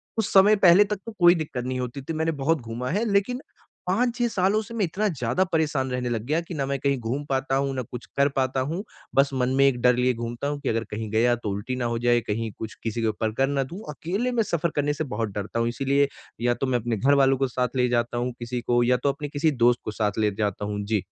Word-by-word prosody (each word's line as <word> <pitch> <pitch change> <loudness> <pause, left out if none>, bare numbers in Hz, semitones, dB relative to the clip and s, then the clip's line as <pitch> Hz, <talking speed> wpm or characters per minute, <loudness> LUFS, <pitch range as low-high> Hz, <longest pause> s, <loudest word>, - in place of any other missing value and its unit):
कुछ 225 - 0
समय 200 +2 +7
पहले 190 -1 +7
तक 210 0 -3
तो 230 - -6
कोई 175 0 +7
दिक्कत 150 -7 -4
नहीं 130 0 -2
होती 125 +2 -4
थी। 165 - -5
मैंने 160 +1 0
बहुत 160 +1 +2
घूमा 120 +2 -5
है, 210 +6 0
लेकिन 225 +6 +1 0.5
5-6 240 +5 +1
सालों 200 0 +1
से 220 +2 -10
मैं 215 -4 +1
इतना 200 +6 -1
ज़्यादा 130 - 0
परेशान 150 -5 0
रहने 125 -1 -2
लग 115 -2 -1
गया 155 +5 +1
कि 170 +1 -9
ना 140 -3 -1
मैं 140 0 -1
कहीं 140 0 +1
घूम 125 +5 -3
पाता 135 0 0
हूँ 135 0 0
ना 130 - -1
कुछ 125 +1 -7
कर 140 +1 +4
पाता 130 0 0
हूँ। 180 +5 -3 0.3
बस 140 +1 +5
मन 125 -1 +1
में 140 - +6
एक 125 -3 +1
डर 125 -1 +5
लिए 125 +1 +2
घूमता 120 +3 -4
हूँ 145 0 -2
कि - - -2
अगर 115 0 0
कहीं 110 0 -4
गया 120 +2 +3
तो 115 -3 -5
उल्टी 100 +6 -3
ना 125 -1 -2
हो 120 0 -1
जाए, 120 0 +3
कहीं 110 0 -3
कुछ 110 - -5
किसी 115 0 -2
के 115 - +1
ऊपर 110 0 -1
कर 135 - +3
ना 140 -1 0
दूँ। 170 +9 -8
अकेले 185 +11 -2
में 230 -2 +2
सफ़र 170 -3 -1
करने 145 0 +1
से 155 - -3
बहुत 115 -6 -3
डरता 105 +3 -3
हूँ। 115 - +1
इसीलिए 140 +3 +1 0.3
या 120 0 +3
तो 125 +3 -2
मैं 125 -2 +1
अपने 115 0 -2
घरवालों 135 +3 +4
को 135 - +1
साथ 125 0 -2
ले 125 -1 +3
जाता 120 0 0
हूँ 125 +1 -1
किसी 120 +1 -4
को 120 0 +2
या 125 +1 +3
तो 140 - +3
अपने 145 +1 -4
किसी 150 +2 +1
दोस्त 120 0 +4
को - - -2
साथ 105 0 -1
ले 105 -1 +2
जाता 105 -1 -1
हूँ। 105 0 -3
जी। 105 -2 0
130 Hz, 265 wpm, -25 LUFS, 120-160 Hz, 0.5 s, समय